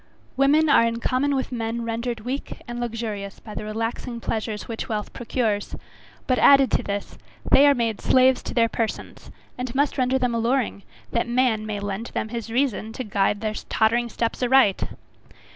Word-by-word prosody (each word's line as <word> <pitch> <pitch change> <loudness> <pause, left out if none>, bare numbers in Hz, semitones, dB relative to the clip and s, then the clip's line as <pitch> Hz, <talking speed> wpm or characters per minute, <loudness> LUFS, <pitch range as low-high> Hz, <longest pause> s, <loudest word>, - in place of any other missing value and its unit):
Women 290 +4 +4
are 280 - +6
in 230 0 0
common 275 +4 +1
with 265 -1 -2
men, 235 -1 -3
rendered 230 0 -3
weak 255 +5 -5
and 240 0 -5
luxurious 220 -4 -4
by 215 - -10
the 210 - -5
relaxing 225 +3 -4
pleasures 220 -2 -3
which 230 +3 -5
wealth 210 -2 -3
procures; 225 -3 -2 0.5
but 255 - +1
added 275 -4 +6
to - - +2
this, 200 0 -5 0.3
they 285 +2 +7
are 285 - +5
made 230 -4 -1
slaves 260 0 +4
to - - -7
their 230 -2 +4
persons, 225 -1 -4 0.3
and 250 0 -4
must 285 0 +1
render 255 +1 +2
them 250 -2 0
alluring, 230 -2 0 0.3
that 235 - 0
man 240 -3 +1
may 210 -1 -3
lend 205 +3 -4
them 220 - -2
his 230 -1 -5
reason 235 -3 0
to 255 - -4
guide 205 -1 0
their 215 -1 -1 0.2
tottering 235 +2 +2
steps 230 +2 -2
aright. 250 -5 +4
235 Hz, 175 wpm, -24 LUFS, 220-255 Hz, 0.5 s, they